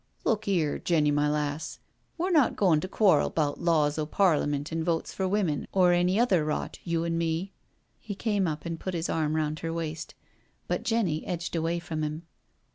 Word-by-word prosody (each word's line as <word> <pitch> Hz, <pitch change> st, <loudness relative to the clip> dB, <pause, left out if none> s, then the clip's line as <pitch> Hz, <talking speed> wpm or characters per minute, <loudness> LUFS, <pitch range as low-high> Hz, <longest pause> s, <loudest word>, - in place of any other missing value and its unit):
^* -, -, -43 dB, 0.2 s
Look 215 Hz, -2 st, 0 dB
'ere, 170 Hz, -7 st, +1 dB
Jenny, 155 Hz, -4 st, +2 dB
my 145 Hz, 0 st, +2 dB
lass. 150 Hz, 0 st, -2 dB, 0.4 s
We're 360 Hz, +3 st, -1 dB
not 300 Hz, -7 st, +4 dB
goin' 175 Hz, -7 st, +3 dB
to 185 Hz, -, -4 dB
quarrel 190 Hz, -6 st, +3 dB
'bout 145 Hz, -3 st, -1 dB
laws 155 Hz, -3 st, +2 dB
o' 150 Hz, -, -1 dB
Parliment 150 Hz, -5 st, +1 dB
and 165 Hz, 0 st, -1 dB
Votes 165 Hz, -1 st, -1 dB
for 190 Hz, -, -1 dB
Women, 185 Hz, -7 st, 0 dB
or 180 Hz, -2 st, +4 dB
any 180 Hz, +3 st, +2 dB
other 195 Hz, -10 st, +3 dB
rot, 150 Hz, 0 st, -3 dB
you 170 Hz, -1 st, -1 dB
an' 165 Hz, 0 st, -1 dB
me." 170 Hz, +4 st, -2 dB, 0.5 s
He 210 Hz, -3 st, -6 dB
came 205 Hz, -3 st, 0 dB
up 150 Hz, -1 st, -4 dB
and 165 Hz, -1 st, -4 dB
put 185 Hz, -1 st, -4 dB
his 165 Hz, 0 st, -2 dB
arm 155 Hz, -1 st, 0 dB
round 155 Hz, 0 st, -1 dB
her 165 Hz, -, -3 dB
waist, 160 Hz, -1 st, -5 dB, 0.5 s
but -, -, -1 dB
Jenny 210 Hz, -10 st, 0 dB
^dged 175 Hz, 0 st, -4 dB
away 165 Hz, +1 st, 0 dB
from 165 Hz, -2 st, -4 dB
him. 155 Hz, +2 st, -4 dB
165 Hz, 200 wpm, -28 LUFS, 155-185 Hz, 0.5 s, not